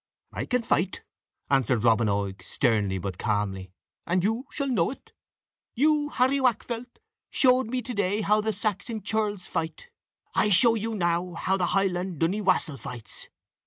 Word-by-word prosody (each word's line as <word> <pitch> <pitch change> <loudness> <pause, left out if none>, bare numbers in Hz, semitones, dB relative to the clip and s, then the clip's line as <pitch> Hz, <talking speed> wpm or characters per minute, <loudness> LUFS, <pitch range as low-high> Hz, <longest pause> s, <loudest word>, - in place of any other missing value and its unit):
"I - - -4
can 250 -1 0
fight," 190 -3 0 0.4
answered 130 -4 +2
Robin 115 -1 +4
Oig, 100 -1 -2
sternly 105 -7 +1
but 95 -1 -5
calmly, 100 -4 -2 0.4
"and 175 +1 +1
you 225 +6 -1
shall 280 - -3
know 235 -11 +1
it. 270 - -10 0.6
You, 295 +3 +2
Harry 265 +1 +2
Waakfelt, 240 0 -1 0.3
showed 255 -2 +4
me 250 +1 -2
to 250 - -5
day 205 0 0
how 210 +1 +3
the 220 +1 0
Saxon 215 +1 -3
churls 210 -3 -1
fight; 165 - -4 0.4
I 210 - +3
show 225 +4 +6
you 225 0 -2
now 175 -1 0
how 190 +3 0
the 180 -2 0
Highland 180 -3 -1
duiniè 190 +6 +1
wassel 170 -6 +2
fights." 120 -8 -8
195 Hz, 160 wpm, -26 LUFS, 135-230 Hz, 0.6 s, show